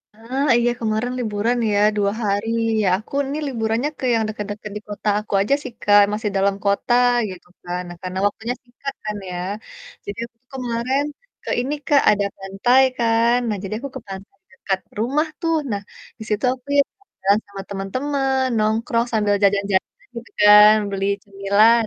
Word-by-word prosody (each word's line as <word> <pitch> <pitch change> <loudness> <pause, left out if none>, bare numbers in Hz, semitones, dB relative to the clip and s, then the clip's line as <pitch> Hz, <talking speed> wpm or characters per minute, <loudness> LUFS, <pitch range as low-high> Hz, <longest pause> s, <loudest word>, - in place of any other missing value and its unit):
Ah 255 +6 -2
iya, 240 0 +2
kemarin 225 +2 -1
liburan 225 +1 0
ya, 205 - +2 0.2
2 200 -1 +2
hari. 205 +1 0 0.3
Ya 205 - +1
aku 215 - -14 0.2
nih 290 +2 -3
liburannya 230 +1 -1
ke - - -3
yang 225 - +1
dekat-dekat 210 0 -6
di - - -8
kota 205 0 -6
aku 210 0 -8
aja 210 +8 +1
sih - - -6
Kak, 205 0 +6
masih 210 0 -1
dalam 195 0 +2
kota 200 +4 +1 0.4
gitu 185 -2 -10
kan. 175 0 -4
Nah 175 - -8
karena 185 0 -5
waktunya 225 +4 -1
singkat 250 +3 -7
kan 210 -1 -3
ya. 180 - -5 0.7
Jadi 200 - -6
aku 235 -1 -19
tuh 255 - -50
kemarin 255 +2 -1 0.4
ke - - -7
ini 270 +4 -2
Kak, 285 -2 +5
ada 205 -1 +1
pantai 195 +7 +2 0.2
kan. 230 +1 +3
Nah 210 -2 -1
jadi 195 - -4
aku 280 - -6
ke 265 - -6
pantai 195 - -9 0.2
dekat 470 - -2 0.2
rumah 280 +8 +1
tuh. 330 -1 +1 0.2
Nah, 200 -1 -2 0.4
di - - -6
situ 210 +3 0
aku 255 +1 -15
ya - - +8 0.4
jalan 200 +2 +4
sama 200 -1 -8
teman-teman, 265 +7 -1 0.2
nongkrong 225 +2 +1
sambil 210 -2 +2
jajan 200 0 +3
jajan 190 - -1
gitu 235 0 -8
kan, 210 +1 +9 0.2
beli 195 0 -2 0.2
cemilan. 200 +4 +3
215 Hz, 180 wpm, -21 LUFS, 200-245 Hz, 0.7 s, kan